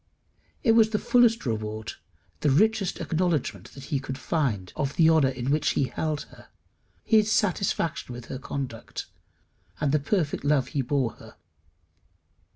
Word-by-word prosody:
It 230 - +5
was 225 -1 +5
the 215 - 0
fullest 235 -3 +3
reward, 110 -1 -3 0.5
the 150 - +2
richest 205 +6 +2
acknowledgment 160 - -1
he 140 +1 -4
could 130 0 -6
find 130 - -1
of 140 -1 -2
the 165 -1 +5
honour 155 -5 +4
in 130 0 -3
which 150 +1 +2
he - - +1
held 150 +4 -2
her, - - -15 0.6
his 220 -1 +3
satisfaction 190 - 0
with 120 -1 -8
her 130 - -6
conduct, 135 -5 -5 0.7
and 150 -2 +1
the 150 - +3
perfect 150 +1 -1
love 145 -3 +2
he 140 - -1
bore 130 -2 0
her. - - -13
145 Hz, 150 wpm, -26 LUFS, 130-180 Hz, 0.7 s, It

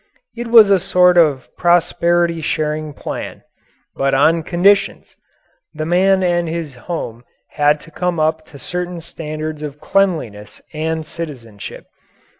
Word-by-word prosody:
It 240 0 -5
was 225 -3 +7
a 195 - +5
sort 180 +1 +4
of 150 -6 +3
prosperity 175 -1 +2
sharing 155 0 -2
plan. - - -7 0.5
But 135 0 +1
on 160 +4 +3
conditions. 180 +5 +1 0.6
The 155 0 -3
man 190 +3 +3
and 175 -2 +1
his 165 -3 -4
home 120 -3 -6 0.3
had 150 0 +2
to 165 - -15
come 180 +1 -2
up 155 0 0
to 145 - -13
certain 180 +4 -4
standards 155 -1 -6
of 150 -1 -7
cleanliness 155 - -1
and 160 +1 -2
citizenship. 125 -11 -8
160 Hz, 130 wpm, -18 LUFS, 150-175 Hz, 0.6 s, was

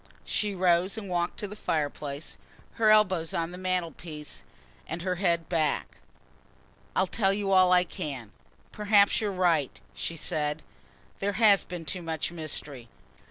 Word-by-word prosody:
She 205 -2 -1
rose 180 +2 +3
and 210 -3 -5
walked 175 0 -1
to 205 - -3
the 205 - -8
fireplace, 145 -4 -3 0.5
her 215 - +6
elbows 185 -7 +4
on 165 0 -1
the 180 - -8
mantelpiece, 170 -4 -4 0.5
and 175 - -5
her 180 -1 -1
head 170 -3 +1
back. 160 -3 -1 1.0
"I'll 190 - +3
tell 195 +1 +1
you 200 0 -1
all 185 -1 +6
I 180 0 +6
can. 135 - -6 0.4
Perhaps 205 -1 +4
you're 210 -2 0
right," 170 -7 +1
she 165 - -4
said. 155 -1 -1 0.6
"There 200 +1 0
has 205 -2 +5
been 175 -2 -7
too 180 +3 -3
much 165 -1 -3
mystery. 145 -6 -6
175 Hz, 150 wpm, -28 LUFS, 160-195 Hz, 1.0 s, her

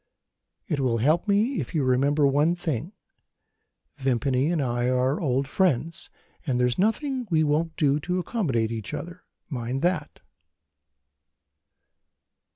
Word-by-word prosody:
It 155 -7 -1
will 125 -4 +1
help 155 - +2
me 215 +6 +2
if 130 - -7
you 150 - +2
remember 140 +3 +2
one 145 +5 +3
thing. 165 - -3 1.1
Vimpany 130 +1 +1
and 170 - 0
I 120 -2 0
are 130 +3 +1
old 135 -3 0
friends, 165 - 0 0.3
and 130 -6 -1
there's 125 +2 +1
nothing 250 +5 0
we 160 -3 +3
won't 155 +2 0
do 145 -3 +2
to 180 +5 -2
accommodate 150 - -1
each 110 -3 -4
other. 175 +1 -8 0.2
Mind 130 0 -3
that!" 175 -4 -1
145 Hz, 130 wpm, -25 LUFS, 130-175 Hz, 1.1 s, one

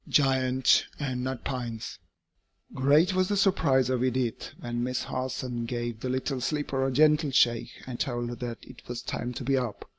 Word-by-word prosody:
GIANT 130 -2 +3
AND 130 -4 -2
NUT 130 -1 -3
PINES. 120 -4 -4 0.7
Great 150 +8 +4
was 185 0 +2
the 205 - +1
surprise 160 - +3
of 125 -1 +1
Edith 125 -2 -1
when 120 0 -3
Miss 125 0 -1
Harson 130 -2 -3
gave 120 -1 -3
the 130 - -3
little 130 +1 -1
sleeper 140 -1 -1
a - - -1
gentle 150 +2 +4
shake 120 -3 +2
and 125 -2 -6
told 120 -2 -1
her 120 - -4
that 120 0 -4
it 125 - -13
was 120 0 -5
time 120 +1 -3
to 125 - -5
be 135 +2 +2
up. 125 -4 -3
130 Hz, 180 wpm, -28 LUFS, 120-135 Hz, 0.7 s, Great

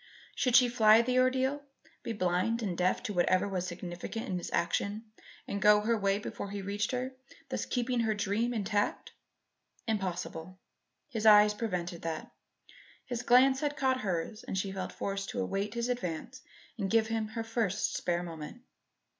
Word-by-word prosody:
Should 250 -3 +1
she 250 -1 +8
fly 225 -1 +6
the 255 +1 +2
ordeal? 260 +2 +2 0.4
Be - - -4
blind 205 +4 0
and 190 -4 -2
deaf 180 +1 +1
to 205 - -3
whatever 185 +2 +2
was 185 -2 -2
significant 175 +5 -6
in 180 -2 -1
his - - -6
action, 200 +5 -1 0.4
and 200 - -3
go 210 +1 +6
her 230 +2 +1
way 200 -2 +1
before 200 -1 -6
he 200 0 -5
reached 200 +2 -2
her; 255 0 -2 0.4
thus - - -3
keeping 245 0 0
her 220 -2 +1
dream 210 +4 0
intact? 205 -2 -1 0.8
Impossible. 185 -4 -3 0.5
His 220 -5 0
eye 210 0 +9
prevented 180 -6 -3
that. 160 -1 -5 0.7
His 245 -2 -3
glance 260 +2 +5
had 295 0 -2
caught 260 -1 +1
hers 190 +2 -3
and 190 - -4
she 190 0 -1
felt 190 -1 -4
forced 195 0 -4
to - - -4
await 205 -1 -2
his 235 0 -1
advance 245 +1 -4 0.4
and 195 -2 -1
give 225 +1 +4
him 220 -1 -2
her 225 +1 -4
first 225 -3 -1
spare 175 0 -1
moment. 165 +8 -8
210 Hz, 170 wpm, -31 LUFS, 185-235 Hz, 0.8 s, eye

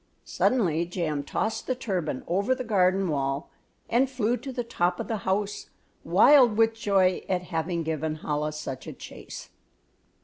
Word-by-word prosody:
Suddenly 170 -9 +1
Jam 165 -5 -2
tossed 220 +9 -2
the 255 - 0
turban 185 - -3
over 200 +9 +1
the 255 - -4
garden 190 -3 +2
wall 140 -2 -2 0.4
and 250 +3 +2
flew 245 -3 0
to 270 +2 -7
the 245 -1 -3
top 180 -6 -1
of - - -4
the 225 - -1
house, 205 +1 -1 0.3
wild 255 -7 +6
with 225 0 +4
joy 195 -4 +2
at 180 -1 0
having 165 +1 -1
given 155 0 -3
Chola 150 +1 -1
such 150 -4 -6
a - - -6
chase. - - -10
185 Hz, 160 wpm, -26 LUFS, 160-225 Hz, 0.4 s, wild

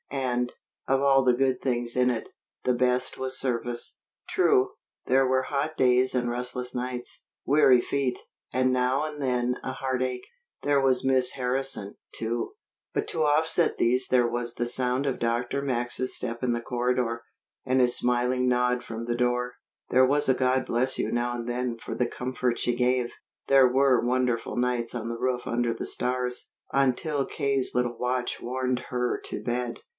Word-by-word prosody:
And, 125 -3 -1 0.4
of 135 0 +3
all 135 -1 +5
the 125 -1 +4
good 130 +1 +1
things 120 -2 -1
in 125 0 +3
it, 120 -3 -3 0.3
the 125 - +2
best 125 +1 +1
was 130 0 -2
service. 120 -2 -3 0.3
True, 130 +1 +3 0.3
there 130 +1 +3
were 130 0 +2
hot 145 +4 -2
days 125 0 +3
and 120 -1 +1
restless 125 +1 -4
nights, 125 0 -5 0.2
weary 135 -3 +6
feet, 130 0 -1 0.3
and 130 +1 +2
now 130 +3 +1
and 150 -1 -6
then 125 -1 0
a 130 - -3
heartache. 130 -1 -2 0.4
There 145 -1 +3
was 130 -1 +2
Miss 130 -1 +3
Harrison, 130 -5 -2 0.2
too. 115 - -3 0.4
But - - -1
to 160 - 0
offset 160 +3 +2
these 125 +2 +2
there 125 -2 +3
was 120 0 -2
the 120 - -1
sound 125 +2 0
of 135 -2 -1
Dr. 120 +3 -1
Max's 130 -1 -1
step 115 0 -4
in 125 - +2
the 120 0 -1
corridor, 120 -1 -1 0.4
and 130 0 +1
his 125 -1 +4
smiling 125 +1 +1
nod 125 0 +1
from 115 0 -6
the 120 0 -1
door; 125 0 0 0.4
there 130 +1 +6
was 145 +2 +2
a 130 - +5
"God 130 0 +1
bless 130 +3 0
you" - - -1
now 120 0 0
and 120 -1 -5
then 120 -1 -2
for - - -7
the 125 - 0
comfort 125 0 -2
she 120 - 0
gave; 125 0 +1 0.3
there 135 -2 +6
were 130 -1 +3
wonderful 125 -2 0
nights 125 -1 0
on 115 -1 -3
the 115 0 -4
roof 125 -1 0
under 120 0 0
the 115 - -5
stars, 125 0 -2 0.2
until 140 +2 +1
K.'s 135 -2 -1
little 120 -1 0
watch 125 0 -2
warned 130 0 -1
her 125 -1 -1
to - - -4
bed. 120 0 -2
125 Hz, 175 wpm, -27 LUFS, 120-130 Hz, 0.4 s, weary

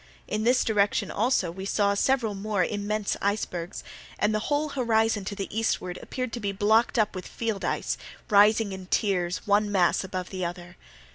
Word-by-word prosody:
In 215 +1 -2
this 250 +2 +4
direction 205 -3 +1
also 210 -6 +1
we 190 +2 -7
saw 200 +1 +2
several 230 +1 +1
more 200 -1 0
immense 210 0 -2
icebergs, 195 -4 -2 0.3
and 210 +1 +1
the 215 - +1
whole 295 +1 +1
horizon 225 -6 +1
to 200 - -4
the 195 - -4
eastward 200 -5 -1
appeared 255 -2 -4
to 240 - -3
be 200 -3 -2
blocked 220 +5 +2
up 215 -2 +2
with 185 -2 -6
field 220 -4 -3
ice, - - -1 0.3
rising 210 0 +5
in 190 -1 -7
tiers, 180 -4 0
one 205 0 +2
mass 185 -2 +3
above 185 -1 -5
the 185 -1 -4
other. 175 +1 -6
205 Hz, 180 wpm, -27 LUFS, 190-220 Hz, 0.3 s, rising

